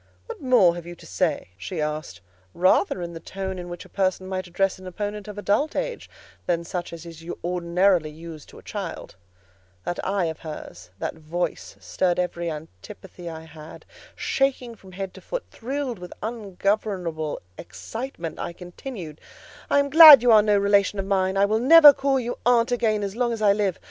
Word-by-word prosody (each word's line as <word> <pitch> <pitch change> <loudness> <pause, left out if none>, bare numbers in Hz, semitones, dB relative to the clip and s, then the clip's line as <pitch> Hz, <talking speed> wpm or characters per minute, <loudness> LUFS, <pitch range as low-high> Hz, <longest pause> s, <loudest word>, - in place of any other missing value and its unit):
"What - - -9
more 245 -10 +5
have 175 -1 -8
you 175 - -8
to - - -16
say?" 95 -1 -1
she 165 - -6
asked, 150 - -4 0.3
rather 180 0 +2
in 170 0 -6
the 165 - -7
tone 190 +2 -6
in 175 0 -7
which 175 0 -8
a - - -13
person 185 -1 -1
might 185 -1 -4
address 185 +2 0
an 185 - -10
opponent 205 +3 -5
of 210 -1 -8
adult 210 +9 0
age - - -4 0.4
than 170 -1 0
such 175 +1 -5
as 170 0 -9
is 165 -1 -11 0.2
ordinarily 175 -1 +1
used 160 0 -11
to - - -14
a - - -14
child. 195 - -6 0.7
That 175 - -4
eye 195 -2 0
of 160 -1 -4
hers, 95 - -9
that - - -3
voice 160 +3 -4
stirred 180 -2 -1
every 175 -1 -2
antipathy 155 - -9
I 160 -1 -8
had. 160 -1 -12 0.3
Shaking 265 -3 -1
from 190 -4 -16
head 190 0 -5
to - - -13
foot, - - -5
thrilled 260 -2 -4
with 180 -1 -9
ungovernable 195 -7 -2 0.2
excitement, 225 -4 -7
I 170 - -4
continued— 175 - -9 0.5
"I - - +3
am 280 0 +1
glad 305 -5 +11
you 245 - +5
are 215 -1 +8
no 210 -1 +3
relation 200 0 +2
of 195 - -2
mine: 190 -1 0
I 200 - +5
will 215 +2 +1
never 295 +3 +9
call 270 0 +1
you 245 0 -4
aunt 245 0 +3
again 220 -4 +1
as 200 0 -4
long 240 0 0
as 225 - -5
I 200 -1 +5
live. 200 -4 -1
190 Hz, 190 wpm, -24 LUFS, 170-220 Hz, 0.7 s, glad